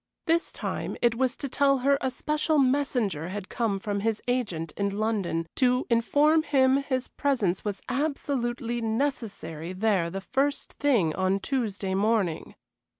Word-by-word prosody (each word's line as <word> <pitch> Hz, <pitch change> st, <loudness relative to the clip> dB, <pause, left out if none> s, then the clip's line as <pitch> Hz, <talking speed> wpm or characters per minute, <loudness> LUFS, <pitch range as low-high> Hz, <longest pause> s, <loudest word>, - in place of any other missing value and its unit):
This 335 Hz, 0 st, +1 dB
time -, -, -4 dB
it 240 Hz, -2 st, +3 dB
was 255 Hz, +1 st, 0 dB
to 280 Hz, -, -4 dB
tell 275 Hz, +1 st, +3 dB
her 280 Hz, 0 st, +4 dB
a 260 Hz, -, +1 dB
special 305 Hz, +4 st, 0 dB
messenger 255 Hz, -, +1 dB
had 200 Hz, 0 st, -6 dB
come 225 Hz, -4 st, 0 dB
from 200 Hz, +1 st, -2 dB
his 220 Hz, +1 st, 0 dB
agent 200 Hz, -11 st, -1 dB
in 200 Hz, 0 st, -1 dB
London 205 Hz, -7 st, 0 dB
to 250 Hz, 0 st, +3 dB
inform 290 Hz, +7 st, +4 dB
him 270 Hz, -3 st, +3 dB
his 260 Hz, -2 st, -2 dB
presence 225 Hz, -11 st, 0 dB
was 205 Hz, -2 st, -4 dB
absolutely 245 Hz, -4 st, -1 dB
necessary 220 Hz, -, -3 dB
there 190 Hz, -3 st, +1 dB
the 195 Hz, +3 st, -4 dB
first 280 Hz, +7 st, -1 dB
thing 230 Hz, -, +3 dB
on 185 Hz, +2 st, +1 dB
Tuesday 205 Hz, -5 st, -2 dB
morning. 200 Hz, -4 st, 0 dB
235 Hz, 150 wpm, -27 LUFS, 195-275 Hz, -, her